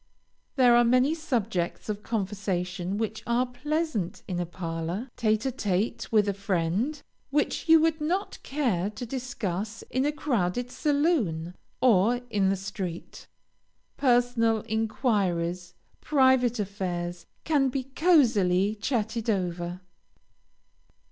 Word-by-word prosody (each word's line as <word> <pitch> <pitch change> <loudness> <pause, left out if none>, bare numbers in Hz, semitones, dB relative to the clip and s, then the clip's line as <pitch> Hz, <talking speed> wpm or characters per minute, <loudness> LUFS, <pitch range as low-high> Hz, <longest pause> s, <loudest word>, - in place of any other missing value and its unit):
There 250 -3 +6
are 240 - +6
many 255 +5 +3
subjects 230 - -2
of 210 -1 -3
conversation 190 -3 -2
which 220 0 -3
are 240 +2 +2
pleasant 295 - -2
in 180 -2 -2
a 175 - -2
parlor, 170 +6 -4
tête 215 -2 +1
à 265 - +1
tête 210 -4 -2
with 210 -2 +4
a 200 - +1
friend, 200 - -1 0.3
which 295 +3 -1
you 325 0 +8
would 320 -1 +1
not 360 +6 -1
care 235 - 0
to 215 +3 -7
discuss 225 -5 -4
in 260 - +1
a 295 - +2
crowded 245 -5 -1
saloon, 285 - 0 0.3
or 235 +1 +4
in 195 -3 +2
the 195 - +2
street. 190 -3 -6 0.7
Personal 240 -4 +2
inquiries, 190 -6 -1 0.2
private 260 -4 +3
affairs 180 -3 -4 0.2
can 285 -4 +2
be 260 +1 -2
cosily 235 - +3
chatted 225 0 -2
over. 180 -2 -2
220 Hz, 120 wpm, -27 LUFS, 185-260 Hz, 0.7 s, you